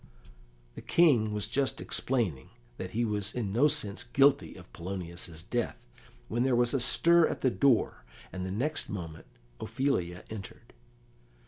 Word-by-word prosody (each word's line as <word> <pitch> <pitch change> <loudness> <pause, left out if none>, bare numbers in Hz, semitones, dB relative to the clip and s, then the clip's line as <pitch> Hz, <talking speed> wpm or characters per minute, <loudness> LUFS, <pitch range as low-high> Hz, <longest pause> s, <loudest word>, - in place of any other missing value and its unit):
The - - -9
King 130 -11 +3
was 105 -2 -1
just 130 +5 -1
explaining 95 - -1 0.3
that 95 - -5
he 115 +5 -1
was 105 -2 -3
in 105 -6 -2
no 130 +7 +4
sense 120 -9 0
guilty 135 +3 +2
of 90 -1 -14
Polonius's 85 -2 -6
death, 120 +4 -2 0.5
when 120 - -1
there 130 -1 +2
was 120 0 +2
a 135 - +2
stir 170 +6 +5
at - - -5
the 130 - +2
door, 135 -4 +2 0.3
and 90 0 -4
the 95 - -4
next 130 +11 -1
moment 80 -5 -7 0.3
Ophelia 90 -11 -2
entered. 110 +2 -10
110 Hz, 150 wpm, -29 LUFS, 95-135 Hz, 0.5 s, stir